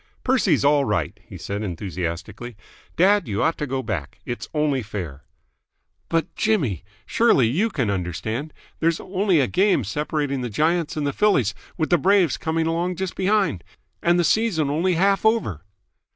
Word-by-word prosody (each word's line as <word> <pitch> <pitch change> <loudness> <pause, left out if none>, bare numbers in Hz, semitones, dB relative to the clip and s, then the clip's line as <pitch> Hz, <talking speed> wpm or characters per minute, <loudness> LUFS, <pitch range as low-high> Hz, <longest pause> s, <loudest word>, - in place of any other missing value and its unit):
"Percy's 210 - +2
all 145 0 +4
right." - - -2
he - - -9
said 100 +1 -4
enthusiastically. 95 +4 -5 0.4
"Dad, 195 -1 +4
you 105 0 -1
ought 165 +1 +2
to 150 - -2
go 130 0 -2
back. 95 - -4
It's 120 - -5
only 150 -3 +1
fair." 90 - -7 0.8
"But, 165 -1 -1
Jimmy! 145 - 0 0.2
Surely 225 - +3
you 185 - +1
can 125 - -1
understand? 105 - -3 0.3
There's 165 0 +1
only 190 -2 +1
a 135 - +3
game 185 - +2
separating 145 +3 -2
the 120 - -3
Giants 160 - 0
and 150 - -1
the 140 - -1
Phillies, 140 - +2 0.2
with 160 -1 -1
the 175 - +5
Braves 190 -2 +3
coming 160 0 -1
along 170 +2 -1
just 190 +1 -3
behind. 195 - +1 0.4
And 175 +1 +3
the - - +3
season 170 -7 +1
only 170 +4 +1
half 195 +3 +2
over!" 220 - +1
150 Hz, 165 wpm, -23 LUFS, 110-185 Hz, 0.8 s, the